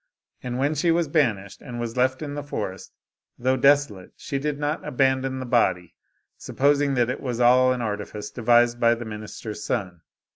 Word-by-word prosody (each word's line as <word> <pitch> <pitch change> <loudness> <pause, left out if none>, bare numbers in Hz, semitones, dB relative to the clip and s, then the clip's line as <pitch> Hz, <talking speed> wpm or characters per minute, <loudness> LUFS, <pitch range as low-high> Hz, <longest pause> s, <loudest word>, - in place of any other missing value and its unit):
And 125 -1 -4
when 140 +3 +1
she 155 +3 0
was 165 0 +2
banished, 115 - 0
and 120 -2 -7
was 115 -1 -4
left 130 +3 +1
in 145 -1 -5
the 145 - -4
forest, 100 -9 -6 0.5
though 130 +2 +1
desolate, 135 -8 +2
she 140 - -4
did 150 0 -2
not 145 +2 -2
aban 130 0 +1
don 130 0 -3
the 130 - -5
body, 95 -8 +1 0.5
supposing 140 0 +1
that 120 0 +2
it 130 - -6
was 125 -3 -3
all 125 +1 +5
an 125 -1 -2
artifice 105 -1 -5
devised 120 0 +3
by 115 0 +4
the 120 0 -7
minister's 105 0 -7
son. 90 -8 -3
125 Hz, 185 wpm, -24 LUFS, 115-140 Hz, 0.5 s, all